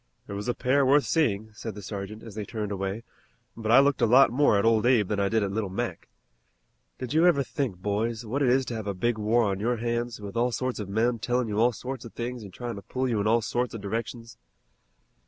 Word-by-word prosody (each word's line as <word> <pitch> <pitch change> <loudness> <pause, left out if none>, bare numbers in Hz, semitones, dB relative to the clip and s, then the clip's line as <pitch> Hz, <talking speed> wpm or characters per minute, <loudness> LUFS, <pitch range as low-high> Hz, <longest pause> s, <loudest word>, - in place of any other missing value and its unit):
"It - - -6
was 100 +2 -5
a 120 - 0
pair 140 +2 +2
worth 140 +2 +4
seeing," 110 -9 0
said 110 0 -7
the 105 - -9
sergeant, 100 +2 -6
as 115 - -10
they 105 +1 -4
turned 105 0 -4
away, 95 +3 -3 0.5
"but 110 -1 -2
I 120 - +8
looked 140 0 +3
a - - +4
lot 130 +4 +6
more 130 -4 +3
at 100 - +1
Old 115 -1 +4
Abe 115 -6 +4
than 105 - -1
I 100 0 +1
did 110 0 +1
at 100 - -2
'Little 105 -1 -2
Mac.' 95 - -4 0.9
Did 125 -2 -5
you 165 +3 +5
ever 140 -6 +4
think, 130 -7 -3
boys, 110 +4 -2
what 130 +7 -2
it 130 - +3
is 130 +1 +3
to 120 - -5
have 110 -2 -5
a 100 - -2
big 115 +4 0
war 115 +3 +2
on 100 -2 -1
your 120 +3 0
hands, 120 0 -2
with 100 +1 -8
all 120 +2 +1
sorts 130 0 -2
of 100 -2 -5
men 115 +3 +1
tellin' 125 +2 0
you 105 0 -2
all 120 +2 +4
sorts 125 +2 -6
of 115 - -11
things 120 0 -5
an' 100 - -9
tryin' 120 +3 -6
to - - -7
pull 130 +7 -2
you 115 -4 0
in 105 - 0
all 115 +1 +3
sorts 120 +2 -2
of 110 - -6
directions?" 115 +3 -5
115 Hz, 255 wpm, -27 LUFS, 105-125 Hz, 0.9 s, I